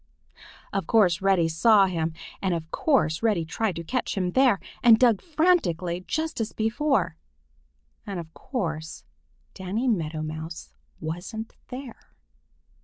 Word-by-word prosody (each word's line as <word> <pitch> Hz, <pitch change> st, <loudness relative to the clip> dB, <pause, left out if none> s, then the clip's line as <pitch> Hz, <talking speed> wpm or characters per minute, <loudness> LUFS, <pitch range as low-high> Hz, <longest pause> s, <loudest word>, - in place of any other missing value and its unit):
Of 195 Hz, -5 st, -1 dB
course 195 Hz, -7 st, +4 dB
Reddy 190 Hz, -4 st, +3 dB
saw 200 Hz, +5 st, +5 dB
him, 165 Hz, -3 st, -2 dB, 0.3 s
and 185 Hz, -3 st, +1 dB
of 165 Hz, -1 st, -6 dB
course 160 Hz, -, +1 dB
Reddy 210 Hz, -8 st, +1 dB
tried 195 Hz, +3 st, -1 dB
to 170 Hz, -, -5 dB
catch 250 Hz, +4 st, -2 dB
him 180 Hz, -2 st, 0 dB
there, 250 Hz, -3 st, +4 dB, 0.2 s
and 230 Hz, -2 st, +7 dB
dug 230 Hz, -4 st, +4 dB
frantically 295 Hz, -, +1 dB
just 315 Hz, -5 st, -2 dB
as 220 Hz, -, -3 dB
before. 225 Hz, -, 0 dB, 0.9 s
And 195 Hz, -3 st, -4 dB
of 160 Hz, -1 st, -9 dB
course 160 Hz, -, -4 dB, 0.5 s
Danny 200 Hz, +7 st, -2 dB
Meadow 160 Hz, -8 st, 0 dB
Mouse 155 Hz, +1 st, -7 dB, 0.3 s
wasn't 175 Hz, +8 st, -5 dB
there. 255 Hz, -2 st, -10 dB
195 Hz, 130 wpm, -26 LUFS, 165-235 Hz, 0.9 s, and